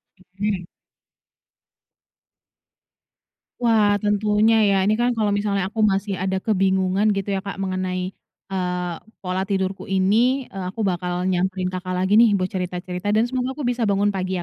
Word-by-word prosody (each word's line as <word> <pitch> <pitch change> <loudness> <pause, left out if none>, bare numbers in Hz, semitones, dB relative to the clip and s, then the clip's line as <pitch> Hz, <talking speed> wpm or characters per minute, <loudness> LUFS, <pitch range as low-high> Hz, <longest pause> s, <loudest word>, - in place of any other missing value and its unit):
Oke. 190 0 -4 3.0
Wah 215 -3 +4
tentunya 210 +2 +3 0.2
ya - - +3
ini 210 +3 +3
kan 240 0 +2
kalau 215 -2 +1
misalnya 205 -1 0
aku 225 - -10
masih 195 0 -1
ada 190 0 -1
kebingungan 190 -1 +1
gitu 195 0 -3
ya 195 - 0
Kak 200 - -4
mengenai, 185 -1 -2 0.4
eee, 180 -2 -2 0.3
pola 185 0 -1
tidurku 190 -1 -2
ini, 225 +8 +2
eee, 190 -2 -6
aku 225 - -6
bakal 180 -2 -1
nyamperin 185 0 0
Kakak 185 0 -4
lagi 190 +4 +3
nih 230 -3 +6
buat 185 -1 0
cerita 180 -1 -3
cerita 180 +2 -5
dan 220 - +4
semoga 260 0 -2
aku 300 - -6
bisa 235 -2 -1
bangun 200 +1 +2
pagi 185 -2 -2
195 Hz, 150 wpm, -22 LUFS, 185-210 Hz, 3.0 s, nih